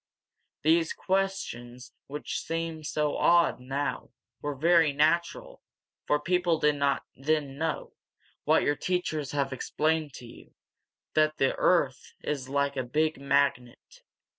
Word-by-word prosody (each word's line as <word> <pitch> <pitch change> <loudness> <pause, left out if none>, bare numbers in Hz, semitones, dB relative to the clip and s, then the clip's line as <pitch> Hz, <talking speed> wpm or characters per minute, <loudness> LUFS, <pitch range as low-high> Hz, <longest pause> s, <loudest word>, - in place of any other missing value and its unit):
These 165 +1 +3
questions, 135 -11 -3
which 150 +2 -4
seem 165 -1 -4
so 150 0 -1
odd 170 -4 +4
now, 135 +1 -3 0.3
were 145 -1 -3
very 165 +1 +4
natural, 170 - 0 0.5
for 150 - +2
people 175 +1 +1
did 150 -1 +2
not 140 -1 +1
then 145 0 -1
know, 160 -1 -3 0.5
what - - +3
your 145 - +2
teachers 155 -6 -2
have 140 -2 -1
explained 155 +2 -1
to 125 - -10
you, 115 - -15 0.6
that 155 0 +2
the 135 - +2
earth 145 -7 +1
is 135 -3 -3
like 140 0 0
a 130 - 0
big 155 +5 0
magnet. 140 -3 -1
150 Hz, 130 wpm, -28 LUFS, 140-165 Hz, 0.6 s, odd